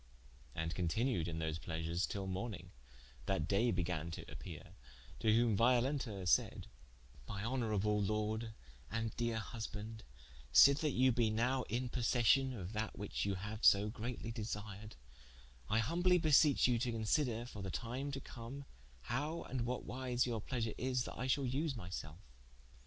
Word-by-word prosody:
And 80 +1 -2
continued 90 +1 0
in 80 -1 -3
those 80 0 -2
pleasures 80 +2 -2
till 100 -2 -4
morning, 95 -1 -4 0.6
that 75 - 0
daye 110 +5 +3
began 90 -4 -1
to 80 - -7
appeare, - - -9 0.5
to 110 - +3
whome 115 -1 +4
Violenta 120 -3 +2
saide: - - +2 0.6
"My 100 0 -4
honourable 105 -4 +1
Lorde 110 +2 -1 0.3
and 115 0 -2
dere 115 -1 0
husbande, 110 0 -6 0.5
sithe 140 - +8
that 150 -4 0
you 130 +1 +4
be 115 -2 +2
nowe 125 +4 +1
in 120 +3 -1
possession 125 +2 +3
of 100 -5 -6
that 110 0 -3
which 105 -1 -2
you 100 -1 0
haue 105 +3 -5
so 100 0 +6
greatly 115 +1 -5
desired, 105 -2 -5 0.7
I 110 - +2
humbly 175 +10 +3
beseeche 155 -3 +5
you, 120 -2 +2
to 125 0 0
consider 115 +1 0
for 105 -5 -8
the 95 - -4
time 125 +8 -3
to 135 - -2
come, 130 +2 -8 0.4
howe 145 - -2
and 120 -3 -3
what 125 +1 -3
wyse 125 -1 0
your 115 -3 -2
pleasure 115 -2 -2
is 125 -1 0
that - - -7
I 125 - -3
shall 135 +1 +2
vse 135 +3 -1
my 95 -6 -7
selfe. 80 +2 -6
115 Hz, 160 wpm, -36 LUFS, 100-125 Hz, 0.7 s, sithe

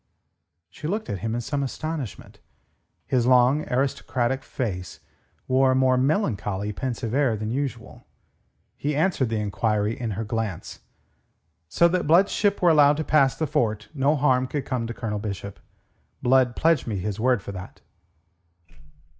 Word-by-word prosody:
She 150 - -7
looked 210 +5 -2
at 100 - -3
him 115 +3 -2
in 120 - -2
some 140 +4 -2
astonishment. 140 - -5 0.7
His 125 -2 +1
long, 130 +4 +3
aristocratic 130 -1 0
face 90 -12 -5 0.5
wore 130 0 +3
a - - +1
more 130 -1 +3
melancholy, 105 - 0
pensive 120 -2 -4
air 130 -5 +2
than 110 +1 -4
usual. 130 -3 -5 0.7
He 145 0 -2
answered 155 -6 +1
the 110 -1 -1
enquiry 105 +1 0
in 115 -1 -4
her 115 - -2
glance: 110 -5 -4 0.9
"So 170 - +4
that 180 -3 -1
Blood's 175 +6 +5
ship 200 -2 0
were 175 - +6
allowed 145 -1 +5
to 155 - -1
pass 140 -3 +3
the 160 - -1
fort, 110 -6 -1
no 145 +1 +2
harm 130 -3 +2
could 140 +1 -3
come 120 -3 -2
to 115 - -5
Colonel 105 -3 -3
Bishop. 100 -1 -6 0.6
Blood 125 -1 +3
pledged 160 -5 +2
me 105 -3 -2
his 100 +2 -4
word 125 -3 +2
for - - -6
that." 90 -1 -9
125 Hz, 155 wpm, -24 LUFS, 110-145 Hz, 0.9 s, were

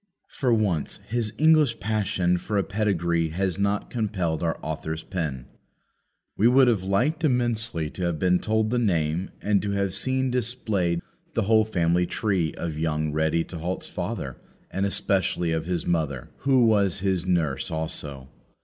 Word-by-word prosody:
For 130 -3 0
once 100 -9 +1
his 115 -2 0
English 155 -6 +4
passion 95 -4 0
for 105 +3 -2
a 100 - +3
pedigree 85 -5 0
has 95 +2 -1
not 100 0 0
compelled 95 -9 -1
our 85 -1 0
author's 80 +1 -4
pen. 75 -9 -4 0.9
We 110 - +4
would 130 +1 +6
have 115 -6 +3
liked 125 - 0
immensely 120 - 0
to 90 - -3
have 85 -2 0
been 90 +1 +3
told 110 0 0
the 125 - +2
name, 85 -5 0
and 105 -2 +2
to 100 - -3
have 100 -2 0
seen 130 +5 0
displayed 105 -8 -1 0.3
the - - +2
whole 110 +1 +4
family 90 -3 +1
tree 95 -7 0
of 80 -3 -4
young 80 -1 0
Ready 80 +2 +1
to 85 - -8
halt's 90 +3 -3
father; - - -4 0.3
and, 95 +1 0
especially, 95 -3 0
of 80 0 -1
his 90 -2 -1
mother. 75 -7 -1
Who 130 -3 +3
was 100 -6 +2
his 95 -2 0
nurse 80 -5 0
also? 75 -4 -3
95 Hz, 160 wpm, -25 LUFS, 80-110 Hz, 0.9 s, would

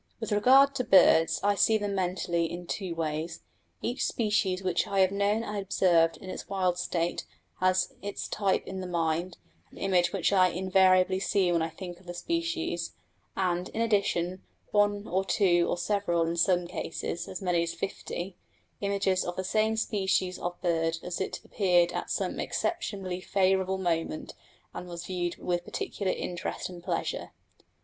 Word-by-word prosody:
With - - -4
regard 265 +7 +6
to 255 - -1
birds, 170 -6 +5
I 205 0 +4
see 220 +2 +4
them 205 -1 -2
mentally 175 -3 -1
in 175 +1 -6
two 180 -1 -4
ways: 160 +1 -3 0.4
each 245 +3 -1
species 205 -4 0
which 185 -2 +1
I 195 -1 +2
have 190 0 +4
known 200 +3 +1
and 210 - -5
observed 170 -4 +3
in - - -11
its 185 - -7
wild 185 -2 0
state 170 -1 -2 0.3
has 185 0 +2
its 205 0 -4
type 195 -2 0
in 190 0 -5
the 185 - -5
mind 170 0 -1 0.3
an - - -17
image 180 -3 +2
which 195 0 +1
I 185 -2 +6
invariably 185 +1 +3
see 190 -2 +2
when 170 -1 +2
I 160 - -1
think 175 +1 -8
of 180 - -21
the 175 - -6
species; 335 - -2 0.4
and, 180 -1 0
in - - -5
addition, 195 -5 +1 0.3
one 205 0 +2
or 190 +2 0
two 175 -3 +3
or - - 0
several, 175 -2 +1
in 165 +1 -1
some 175 +1 +2
cases 170 0 -4
as 185 - -6
many 180 -3 +1
as 170 0 -2
fifty, 190 -1 -5 0.4
images 200 -2 +1
of 175 - -4
the 185 - -2
same 220 +3 +1
species 190 -4 0
of 175 0 -4
bird 165 -1 +1
as 180 +1 -4
it - - -3
appeared 175 -4 +3
at - - -4
some - - -2
exceptionally 195 - -2
favourable 190 0 +1
moment 165 -4 -2 0.4
and 180 - -7
was 175 0 -7
viewed 175 -1 -2
with 175 -1 -2
peculiar 195 -2 -2
interest 175 +1 -4
and 175 -2 -10
pleasure. 175 -2 -3
185 Hz, 170 wpm, -29 LUFS, 175-200 Hz, 0.4 s, regard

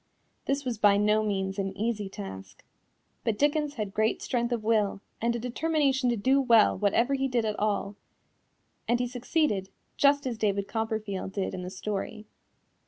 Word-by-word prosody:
This 275 0 -1
was 240 -4 -2
by 205 -1 +5
no 210 +1 +3
means 195 -2 -2
an 195 0 -3
easy 210 -2 -1
task. 95 - -9 0.6
But 220 -3 0
Dickens 295 +1 +1
had 210 -4 -4
great 220 +1 +1
strength 240 -1 -1
of 235 -3 -1
will 215 -3 +1 0.2
and 235 +1 +1
a - - -2
determination 270 +1 +1
to 240 - +1
do 265 +6 +3
well 230 -4 +5
whatever 230 +6 +2
he 270 0 +1
did 245 -3 0
at 215 -1 -2
all, 205 -1 -1 0.9
and 240 0 +2
he 250 - +1
succeeded, 245 - 0 0.3
just 285 0 +4
as 240 -4 -3
David 200 -2 0
Copperfield 220 -4 -3
did 195 -2 -2
in 185 - -4
the 180 - -5
story. 205 +2 -4
220 Hz, 170 wpm, -28 LUFS, 200-250 Hz, 0.9 s, by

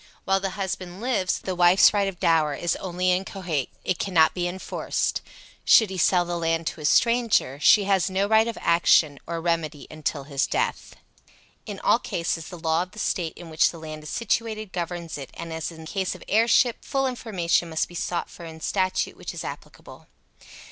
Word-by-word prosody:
While 195 0 +2
the 195 0 -4
husband 185 -2 -4
lives 220 -6 0
the 185 - -4
wife's 175 +3 +6
right 200 -1 +1
of 185 -3 -5
dower 155 -3 +2
in 175 - -7
only 180 0 0
inchoate; 180 -6 -2
it 185 - -1
cannot 165 -5 +3
be 175 -1 -1
enforced. 185 +2 -2 0.4
Should 220 -4 +5
he 190 - -5
sell 175 0 +3
the 175 0 -3
land 165 0 0
to - - -4
a - - -5
stranger, 230 - +2
she 205 +7 +6
has 195 -1 +2
no 190 +1 +1
right 220 +1 +4
of 230 - -4
action 155 -4 +3
or 170 0 -3
remedy 165 -3 -2
until 155 -2 -3
his 140 -1 -1
death. - - -2 0.7
In - - -6
all - - +3
cases 165 0 -3
the 180 - -9
law 160 0 +1
of 180 0 -6
the - - -15
State 175 -6 -2
in 170 -2 -10
which 155 - +3
the 170 - -9
land 155 -1 -8
is 150 - -9
situated 220 -2 -2
governs 170 -3 -4
it, 135 - -8
and, 165 -1 -6
as 160 +1 -4
in 160 -1 -12
the - - -10
case 190 +2 -2
of - - -12
heirship, 230 +2 +3
full 270 0 -1
information 190 -9 0
must 160 -1 -1
be - - -15
sought 175 0 -2
for 175 - -12
in 160 -1 -9
statute 185 +2 -1
which - - -7
is - - -5
applicable. - - -10
175 Hz, 200 wpm, -25 LUFS, 165-195 Hz, 0.7 s, wife's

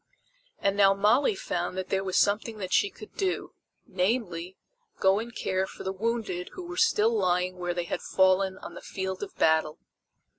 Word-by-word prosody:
And 200 0 0
now 195 -1 +5
Molly 215 +4 +3
found 175 -1 -3
that 185 0 -4
there 195 0 0
was 185 -1 -1
something 215 +2 +1
that 185 -3 -4
she 200 - +4
could 215 - -13
do 380 -2 -2 0.3
namely, 185 -2 -1 0.4
go 190 +1 +4
and 235 +2 -6
care 190 0 -1
for - - -10
the 190 - -2
wounded 210 -4 -2
who 365 - -7
were 350 - -6
still 230 - +3
lying 180 -2 +1
where 175 -1 -2
they 175 - -1
had 170 - -4
fallen 190 0 +2
on - - -9
the - - -9
field 190 -1 -4
of 205 - -6
battle. 160 -1 +2
190 Hz, 185 wpm, -28 LUFS, 185-215 Hz, 0.4 s, now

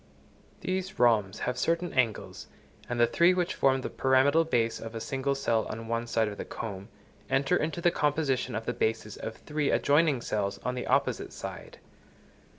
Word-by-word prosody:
These 185 0 -3
rhombs 110 -5 +3
have 125 0 -2
certain 170 +4 0
angles, 120 -6 -1 0.4
and 120 0 -2
the 120 - +7
three 170 +9 +4
which 180 -1 0
form 135 -1 +2
the - - -4
pyramidal 135 +4 +3
base 115 -7 0
of 115 0 -8
a - - -3
single 135 +3 -1
cell 115 -5 0
on 115 +1 -6
one 115 +1 -2
side 115 -1 +1
of 100 -1 -6
the - - -2
comb, 100 -2 -7 0.4
enter 135 0 +2
into 160 +3 -1
the 175 - +4
composition 140 -6 0
of 110 0 -3
the 120 - -1
bases 110 -2 -1
of 110 - -6
three 150 -1 -2
adjoining 145 -3 +3
cells 100 -3 -2
on 125 - 0
the 125 - -4
opposite - - +1
side. - - -8
125 Hz, 180 wpm, -29 LUFS, 115-150 Hz, 0.4 s, the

